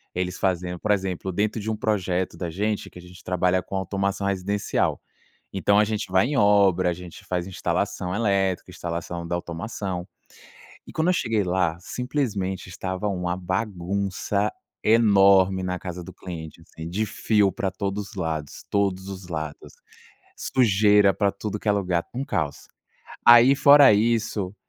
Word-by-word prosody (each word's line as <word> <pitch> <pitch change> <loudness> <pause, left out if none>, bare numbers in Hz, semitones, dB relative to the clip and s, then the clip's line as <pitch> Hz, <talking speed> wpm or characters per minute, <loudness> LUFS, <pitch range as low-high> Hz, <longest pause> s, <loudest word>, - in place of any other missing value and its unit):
eles 90 0 -2
fazendo, 90 -2 -1
por 105 - 0
exemplo, 95 -2 -1
dentro 105 +4 0
de 105 +1 -4
um 110 - 0
projeto 95 -5 -1
da 85 0 -4
gente, 105 +5 -2
que - - -15
a - - -10
gente 90 +1 -15
trabalha 90 0 +1
com 95 - -7
automação 100 +1 -2
residencial. 100 +1 -1 0.5
Então 100 +1 +2
a 105 - +5
gente 105 -2 -3
vai 95 +4 +3
em 145 - -1
obra, 100 -4 +4
a - - -1
gente 90 0 -10
faz 90 -1 -2
instalação 90 -1 -2
elétrica, 100 -4 0
instalação 85 -1 -5
da 85 - -2
automação. 90 +1 -5 0.8
E - - -10
quando 160 +2 0
eu - - +4
cheguei 115 - 0
lá, 90 -2 0
simplesmente 105 -6 -3
estava 95 +2 -4
uma 90 -3 -2
bagunça 100 +2 -2 0.3
enorme 100 -4 +5
na 90 0 -2
casa 90 -1 -7
do - - -10
cliente, 85 -3 -9
assim 80 0 -9
de 105 +5 -1
fio 105 -2 +1
para 95 +2 -2
todos 100 +2 -4
os - - -14
lados, 80 -5 -4
todos 100 -1 0
os 95 -2 -8
lados, 80 -3 -6 0.6
sujeira 105 -4 +3
para 100 0 +1
tudo 105 +1 -5
que - - -8
é - - +6
lugar, 90 -4 0
um 130 +3 -3
caos. 80 - -3 0.6
Aí 120 +3 +8
fora 140 -4 +7
isso, 105 -3 0
95 Hz, 160 wpm, -24 LUFS, 90-105 Hz, 0.8 s, Aí